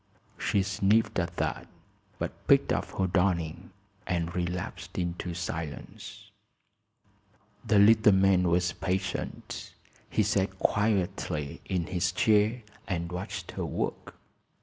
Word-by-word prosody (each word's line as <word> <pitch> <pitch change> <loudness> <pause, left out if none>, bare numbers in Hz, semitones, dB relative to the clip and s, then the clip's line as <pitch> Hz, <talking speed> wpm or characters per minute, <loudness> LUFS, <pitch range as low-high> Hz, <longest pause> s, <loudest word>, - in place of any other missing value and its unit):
She 100 - +1
sniffed, 100 +2 +2
at 85 0 -3
that, - - -2 0.5
but - - -6
picked - - +5
up - - 0
her 95 - +2
darning 90 -3 0 0.4
and 85 -1 -1
relapsed 90 0 -4
into 85 -1 -3
silence. 80 -3 -6 1.3
The 110 - +3
little 110 +1 +7
man 95 -1 +4
was 90 +1 +2
patient. 95 +2 -4 0.3
He 110 - +2
sat 95 -1 0
quietly 95 -9 0
in 90 -3 -1
his 90 0 0
chair 110 +5 +3 0.2
and 85 -2 -2
watched 90 +2 -5
her - - -3
work. - - -4
90 Hz, 115 wpm, -29 LUFS, 85-100 Hz, 1.3 s, little